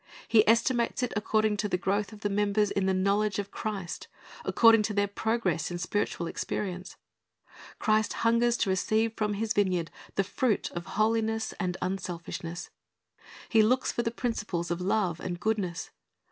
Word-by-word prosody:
He 215 -2 +6
estimates 235 +1 +2
it 250 - -1
according 215 0 +1
to 210 0 -1
the 180 - +1
growth 200 +3 -1
of 215 -1 -12
the 205 - 0
members 205 +1 +2
in 195 -1 0
the - - +3
knowledge 200 +2 +1
of 200 -1 -4
Christ, 200 -5 -4 0.4
according 225 -1 +6
to 210 - -4
their 205 0 +2
progress 200 -6 -1
in 175 - -4
spiritual 175 0 -1
experience. 185 +2 -4 0.8
Christ 215 0 +2
hungers 235 +1 +3
to 200 - 0
receive 220 +4 +1
from 210 -2 -1
His 220 +2 -1
vineyard 185 -6 +1 0.2
the 195 - +2
fruit 230 +3 0
of 175 0 -6
holiness 220 0 +1
and 180 -2 -1
unselfishness. 175 -2 -4 0.8
He 225 - +5
looks 250 +4 +2
for - - -1
the 230 - 0
principles 210 -8 -3
of 175 +1 -2
love 185 -3 0
and 175 -1 -4
goodness. 200 -6 -2
205 Hz, 160 wpm, -29 LUFS, 185-220 Hz, 0.8 s, He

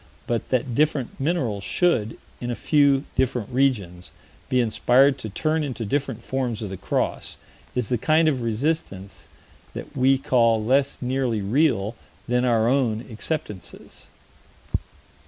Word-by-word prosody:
But 120 -2 -2
that 130 -1 0
different 145 -2 0
minerals 135 - -1
should, 115 - +1 0.2
in 120 - -4
a 120 - -1
few 140 -1 +3
different 125 -4 0
regions, 105 -10 0 0.4
be 130 - +2
inspired 125 +4 +3
to 110 - -5
turn 155 +9 0
into 125 -5 -4
different 130 0 -2
forms 125 -4 -2
of 100 - -5
the - - -4
cross - - -2 0.4
is 125 -4 0
the 125 - 0
kind 155 +5 +3
of 135 -5 +1
resistance 105 - -3 0.5
that - - -8
we 135 +1 +4
call 115 -4 +2
less 135 +3 +2
nearly 125 -4 -1
real 115 -2 +1 0.3
than 125 +1 +2
our 115 -2 +3
own 120 -4 +1
acceptances. 110 - -6
125 Hz, 135 wpm, -24 LUFS, 110-140 Hz, 0.5 s, we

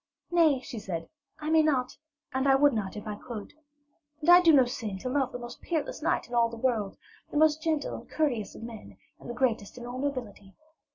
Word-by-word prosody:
'Nay,' 320 -6 +4
she 245 -3 -7
said, 170 -5 -5 0.3
'I 305 - -3
may 320 0 +6
not, 265 -5 +1 0.4
and 265 +1 +1
I 270 - +6
would 285 0 +5
not 205 -4 -3
if 210 - -7
I 210 - -3
could. 210 0 -8 0.7
And 310 +2 -1
I 355 +1 +9
do 335 -2 +6
no 270 -4 +6
sin 220 -5 -4
to 255 - -4
love 265 -1 0
the - - -5
most 240 0 -9
peerless 315 -3 -3
knight 330 +3 0
in 240 - -12
all 235 -1 +3
the 230 - -8
world, 225 -5 -1 0.3
the - - -3
most 310 0 +4
gentle 315 -2 -1
and - - -8
courteous 250 -10 -1
of - - -10
men, 230 -2 -9 0.2
and - - -11
the 240 - -4
greatest 235 -4 -1
in 240 - -8
all 245 +1 -6
nobility. 245 -8 -5
255 Hz, 225 wpm, -28 LUFS, 225-295 Hz, 0.7 s, I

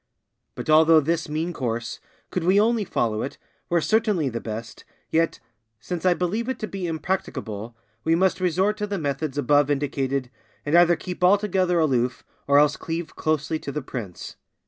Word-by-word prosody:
But - - -6
although 160 +1 +6
this 165 +1 -1
mean 160 +3 -2
course, 120 -4 -3 0.3
could 180 - -1
we 185 +4 +4
only 225 +1 +2
follow 110 - -1
it, 140 - -5 0.3
were 170 -1 +2
certainly 210 - +1
the 115 -1 -4
best, 110 0 -7 0.3
yet, 165 +1 +1 0.4
since 175 - -3
I 180 - +4
believe 210 +8 -1
it 260 - -2
to 215 - -2
be 195 -3 -4
impracticable, 130 - -4 0.3
we 165 +1 +3
must 185 +1 +2
resort 185 +4 +1
to 210 -1 -2
the 205 -1 -2
methods 145 -2 -2
above 145 +1 +3
indicated, 135 -2 -1 0.3
and 145 +3 +1
either 175 0 +6
keep 180 +1 -6
altogether 185 -2 +3
aloof, 130 -6 +1 0.2
or 140 0 +5
else 150 0 +4
cleave 165 -1 -5
closely 155 0 -1
to 140 - -6
the 150 0 -4
prince. 105 -10 -7
160 Hz, 170 wpm, -24 LUFS, 140-180 Hz, 0.4 s, although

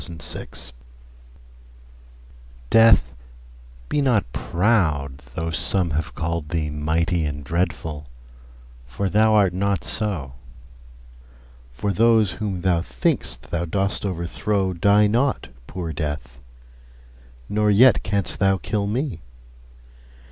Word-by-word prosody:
Death 80 -6 -3 2.0
DEATH, 115 - +5 0.7
be 150 - 0
not 115 - +1
proud, 80 - 0 0.2
though 80 0 -2
some 90 +2 0
have 75 +1 -3
callèd 85 -1 -3
thee 75 -2 -2
Mighty 80 +3 0
and 70 -1 -4
dreadful, 75 -2 -3 0.8
for 80 +11 -3
thou 110 +1 +4
art 100 -4 +4
not 100 -1 0
so: 90 -12 -2 1.4
For 95 +12 -2
those 110 -3 +4
whom 100 -4 -4
thou 90 -3 +2
think'st 60 -3 -2
thou 85 0 -1
dost 95 +4 -1
overthrow 95 +1 -1
Die 100 +4 +4
not, 120 +6 0 0.2
poor 85 -3 -5
Death; 75 -6 -5 1.1
nor 105 0 +1
yet 115 +3 +6
canst 100 0 -2
thou 95 0 +3
kill 100 +3 -2
me. 115 - -2
90 Hz, 105 wpm, -22 LUFS, 80-105 Hz, 2.0 s, yet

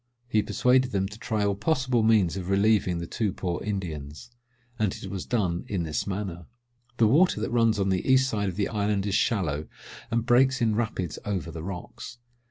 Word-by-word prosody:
He 110 -3 +2
persuaded 130 +4 +2
them 95 -1 +1
to 105 +2 -11
try 110 -3 -1
all 100 - +2
possible 130 +2 +1
means 110 -6 +3
of 95 -1 -5
relieving 100 -2 +2
the 85 - -4
two 105 +4 -1
poor 90 -2 -3
Indians; 90 0 -5 0.5
and 105 -4 +1
it 95 - -8
was 95 -2 -5
done 95 -8 0
in 95 -4 -2
this 75 +2 -3
manner. 95 -4 -4 0.5
The 115 - +4
water 150 +4 +4
that 110 - -3
runs 115 -2 +3
on 95 0 +1
the 95 -1 0
east 130 0 +5
side 105 -5 -1
of 90 - -6
the 100 0 0
island 105 -2 -1
is 100 - -1
shallow, 85 -9 0 0.4
and 115 0 0
breaks 130 +2 +4
in 110 -2 +2
rapids 110 -7 -2
over 90 -6 -3
the 80 - -7
rocks. 95 +7 -7
100 Hz, 195 wpm, -26 LUFS, 90-115 Hz, 0.5 s, east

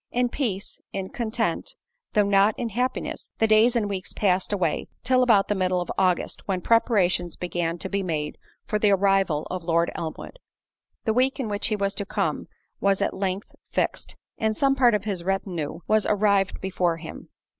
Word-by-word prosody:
In 245 0 +1
peace, 215 -8 -3
in 190 -1 -4
content, 225 - -2 0.4
though 210 -1 +4
not 200 +1 +4
in 240 -2 -2
happiness, 250 +4 -3
the 225 - +3
days 220 +3 +5
and 220 -3 +1
weeks 195 -2 -4
passed 190 -2 +1
away 185 -6 0 0.2
till 255 0 +3
about 220 -6 +4
the - - +1
middle 185 -2 +1
of 175 - -3
August, 185 -2 +1
when 190 -2 0
preparations 185 -5 +2
began 175 -1 -2
to 185 - -5
be 200 +1 -1
made 155 -5 -3 0.3
for 210 - -1
the 210 - +4
arrival 195 -5 +2
of 185 -1 -4
Lord 170 0 +1
Elmwood. 165 - -6 0.7
The 220 - +2
week 255 +4 +2
in 240 -5 -2
which 205 0 0
he 215 - 0
was 200 -1 0
to 200 0 -4
come - - -1 0.3
was 195 -1 +2
at - - 0
length 190 +1 -3 0.2
fixed, - - -1 0.2
and 220 -1 0
some 275 -1 +3
part 245 -4 +5
of 205 - -1
his 195 -5 -3
retinue 175 -4 -2
was 215 -1 +3
arrived 200 -2 +2
before 180 -3 0
him. - - -9
200 Hz, 185 wpm, -25 LUFS, 180-220 Hz, 0.7 s, days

